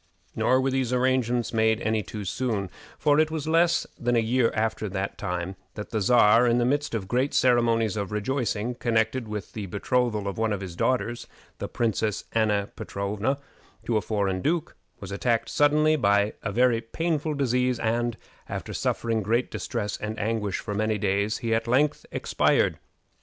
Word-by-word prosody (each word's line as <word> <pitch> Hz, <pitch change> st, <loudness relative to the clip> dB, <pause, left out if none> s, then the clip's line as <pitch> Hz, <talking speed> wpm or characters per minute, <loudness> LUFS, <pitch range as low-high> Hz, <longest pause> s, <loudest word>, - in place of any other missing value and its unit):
Nor 130 Hz, +4 st, +3 dB
were 135 Hz, 0 st, 0 dB
these 130 Hz, -2 st, 0 dB
arrangements 125 Hz, -2 st, +1 dB
made 110 Hz, 0 st, +3 dB
any 110 Hz, -1 st, 0 dB
too 105 Hz, +1 st, -7 dB
soon; 100 Hz, -3 st, -2 dB, 0.3 s
for 145 Hz, 0 st, +3 dB
it 155 Hz, 0 st, +3 dB
was 155 Hz, -2 st, -3 dB
in 160 Hz, -, -2 dB
less 170 Hz, +1 st, +3 dB
than 120 Hz, 0 st, +1 dB
a -, -, +4 dB
year 115 Hz, +1 st, +2 dB
after 110 Hz, -1 st, -1 dB
that 95 Hz, +1 st, -3 dB
time 90 Hz, -1 st, -3 dB, 0.2 s
that 105 Hz, -, -7 dB
the 110 Hz, -2 st, -1 dB
Czar, 115 Hz, +1 st, +5 dB
in 120 Hz, 0 st, +3 dB
the 120 Hz, -, +2 dB
midst 145 Hz, 0 st, 0 dB
of 100 Hz, -4 st, -3 dB
great 125 Hz, +6 st, 0 dB
ceremonies 115 Hz, -4 st, +3 dB
of 100 Hz, -2 st, -3 dB
rejoicing, 115 Hz, +1 st, -1 dB
connected 115 Hz, 0 st, 0 dB
with 105 Hz, -2 st, -6 dB
the 105 Hz, -3 st, -5 dB
betrothal 105 Hz, +1 st, 0 dB
of 100 Hz, -, -4 dB
one 110 Hz, -1 st, +1 dB
of 100 Hz, -, -3 dB
his 90 Hz, -3 st, -6 dB
daughters, 120 Hz, +2 st, -1 dB, 0.3 s
the -, -, -3 dB
Princess 110 Hz, -2 st, -1 dB
Anna 105 Hz, -3 st, +1 dB
Petrowna, 105 Hz, +7 st, -2 dB, 0.5 s
to 115 Hz, -, 0 dB
a 110 Hz, -, +3 dB
foreign 100 Hz, -4 st, -1 dB
duke, 165 Hz, -, -1 dB, 0.2 s
was 100 Hz, -1 st, -8 dB
attacked 115 Hz, +3 st, 0 dB
suddenly 150 Hz, +1 st, +3 dB
by 100 Hz, -5 st, +2 dB
a 105 Hz, -, -3 dB
very 120 Hz, +1 st, +3 dB
painful 155 Hz, +5 st, -2 dB
disease, 125 Hz, -2 st, +1 dB
and, 120 Hz, +1 st, -1 dB, 0.3 s
after -, -, -5 dB
suffering 115 Hz, -1 st, -1 dB
great 115 Hz, +5 st, 0 dB
distress 105 Hz, -4 st, -3 dB
and 105 Hz, 0 st, -5 dB
anguish 105 Hz, -2 st, -1 dB
for 105 Hz, -, -5 dB
many 110 Hz, +1 st, 0 dB
days, 100 Hz, +1 st, 0 dB
he 115 Hz, -, +1 dB
at 115 Hz, +1 st, 0 dB
length 140 Hz, +5 st, +1 dB
expired. -, -, +1 dB
115 Hz, 180 wpm, -26 LUFS, 105-125 Hz, 0.5 s, Czar